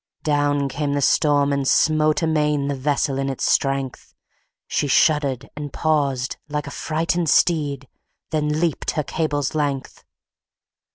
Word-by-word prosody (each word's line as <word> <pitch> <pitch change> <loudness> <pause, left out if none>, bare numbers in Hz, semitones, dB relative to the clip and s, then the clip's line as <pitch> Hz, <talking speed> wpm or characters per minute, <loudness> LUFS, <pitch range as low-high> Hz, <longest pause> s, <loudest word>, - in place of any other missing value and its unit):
Down 145 -1 +1
came 145 +1 -2
the 145 - 0
storm, 145 0 +3
and 140 -1 -1
smote 155 +1 +3
amain, 150 -3 +1
The - - 0
vessel 135 0 0
in 135 0 -1
its 135 - -3
strength: 135 -2 -1 0.5
She 145 - -1
shuddered 140 -2 +2
and 145 -1 -6
paused, 140 -5 0
like 150 0 -3
a 140 - -7
frighted 165 +2 -1
steed, 145 -6 +2 0.4
Then 150 -1 0
leaped 170 -2 -1
her 150 - +1
cable's 145 -2 -2
length. 145 -3 -3
145 Hz, 135 wpm, -22 LUFS, 140-155 Hz, 0.5 s, storm